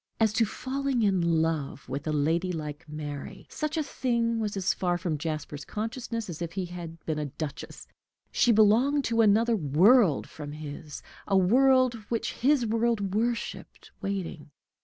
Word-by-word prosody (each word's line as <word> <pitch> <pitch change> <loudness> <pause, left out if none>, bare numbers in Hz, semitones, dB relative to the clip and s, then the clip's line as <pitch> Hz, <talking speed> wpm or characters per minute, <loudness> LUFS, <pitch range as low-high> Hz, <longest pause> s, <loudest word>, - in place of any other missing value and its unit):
As 220 -2 +3
to 225 0 +3
falling 260 +1 -2
in 195 -3 +3
love 160 -4 0
with 140 +4 -5
a - - +1
lady 165 +5 +1
like 155 -1 -6
Mary, 150 -2 -7
such 305 +1 -3
a 310 - +1
thing 235 -4 0
was 210 -2 -2
as 190 0 +1
far 175 -1 0
from 175 -3 -2
Jasper's 155 -2 -4
consciousness 230 - -4
as 175 -2 -7
if 170 -1 -4
she 190 -1 -2
had 170 -2 -9
been 155 -1 -1
a 150 - -2
duchess. 145 +1 -7 0.4
She 240 - +3
belonged 230 +7 +4
to 230 0 +2
another 225 +2 +4
world 180 - +4
from 145 -1 -8
his, 150 -1 -8 0.2
a 195 - +3
world 255 +6 +4 0.2
which 230 -1 -1
his 270 -1 +2
world 225 -3 0
worshiped, 230 +2 -3
waiting. 190 -6 -4
195 Hz, 160 wpm, -28 LUFS, 160-230 Hz, 0.4 s, belonged